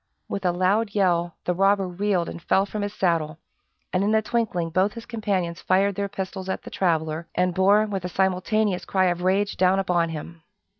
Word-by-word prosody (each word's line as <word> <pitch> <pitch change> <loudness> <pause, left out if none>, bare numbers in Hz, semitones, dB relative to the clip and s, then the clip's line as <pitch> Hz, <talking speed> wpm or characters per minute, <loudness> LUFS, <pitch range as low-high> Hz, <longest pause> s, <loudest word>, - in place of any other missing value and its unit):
With 195 -1 -4
a - - +3
loud 200 +4 +1
yell 175 -4 +1
the 180 - +1
robber 195 +1 +2
reeled 180 -1 0
and 170 - -7
fell 195 +3 +2
from 210 +1 -5
his 205 0 -2
saddle, 165 -6 0 0.6
and 185 +1 +2
in 215 +2 +2
a 220 - +4
twinkling 210 -8 -1
both 190 +5 +2
his 230 -1 -9
companions 195 -8 -2
fired 195 +2 +2
their 200 +1 -3
pistols 190 -1 -5
at - - -3
the - - -10
traveler, 160 -2 -1
and 180 0 +1
bore, 200 +4 +4
with 195 -4 -4
a 180 - -3
simultaneous 190 +2 0
cry 190 -1 +1
of 175 0 -4
rage, 195 +3 +1
down 185 +1 +3
upon 175 -3 +1
him. 165 +1 -8
190 Hz, 200 wpm, -24 LUFS, 175-200 Hz, 0.6 s, a